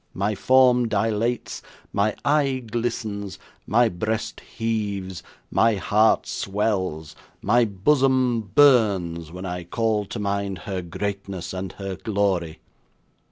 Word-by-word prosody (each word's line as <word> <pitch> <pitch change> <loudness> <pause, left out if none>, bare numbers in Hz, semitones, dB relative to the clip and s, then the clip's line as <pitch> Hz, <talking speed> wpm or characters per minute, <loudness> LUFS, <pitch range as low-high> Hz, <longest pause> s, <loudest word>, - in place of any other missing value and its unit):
My 100 +4 0
form 125 +1 +4
dilates, 110 +3 -1 0.3
my 100 +2 +1
eye 140 -3 +2
glistens, 110 -3 -3 0.3
my 120 +3 +4
breast 110 +3 -3
heaves, 100 -5 -3 0.3
my 115 -1 +3
heart 105 +4 +3
swells, 95 -6 -2 0.3
my 120 +4 +4
bosom 130 +3 +2
burns, 100 - +4
when 90 +2 -7
I 90 -1 -4
call 110 +3 0
to 110 - -7
mind 100 -2 -2
her 95 -2 -3
greatness 100 +1 -5
and 95 0 -5
her 95 -1 -5
glory. 95 -5 -1
105 Hz, 115 wpm, -24 LUFS, 95-115 Hz, 0.3 s, form